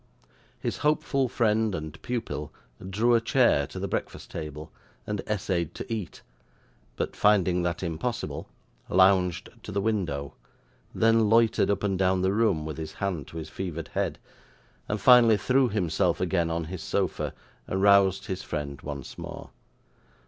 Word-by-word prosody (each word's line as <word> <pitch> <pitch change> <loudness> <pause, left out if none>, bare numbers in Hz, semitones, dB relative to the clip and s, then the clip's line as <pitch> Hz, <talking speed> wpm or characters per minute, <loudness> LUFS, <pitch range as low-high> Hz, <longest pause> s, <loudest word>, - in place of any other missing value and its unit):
His - - -3
hopeful 140 -3 +1
friend 110 -3 +1
and 80 0 -7
pupil 110 -11 -4 0.4
drew 115 +5 +2
a 115 - +4
chair 115 - +3
to - - -10
the - - -2
breakfast - - -4
table, 75 -1 -7 0.3
and 105 -1 -3
essayed 95 -6 -1
to - - -5
eat; 105 -6 -6 0.7
but, - - -3
finding 95 -4 +3
that 85 +1 -2
impossible, 90 +8 -3 0.4
lounged 95 -1 +3
to 105 - -8
the 100 - 0
window, 90 -10 -1 0.6
then 115 -1 +4
loitered 115 -1 +4
up 100 - 0
and 95 -2 0
down 95 -1 +2
the 95 +1 +2
room 100 -8 +2
with 80 -1 -5
his 80 -1 -6
hand 95 -8 -3
to 80 - -9
his 80 - -6
fevered 85 -4 -5
head, - - -2 0.7
and 105 - -1
finally 120 -3 +7
threw 130 +3 +2
himself 90 -4 0
again 85 -2 +1
on 85 0 -1
his 85 +2 -6
sofa, - - -1 0.4
and 95 +1 -1
roused 100 -1 +5
his 95 0 -4
friend 70 -5 -5
once 70 -2 -7
more. - - -8
95 Hz, 155 wpm, -27 LUFS, 85-110 Hz, 0.7 s, finally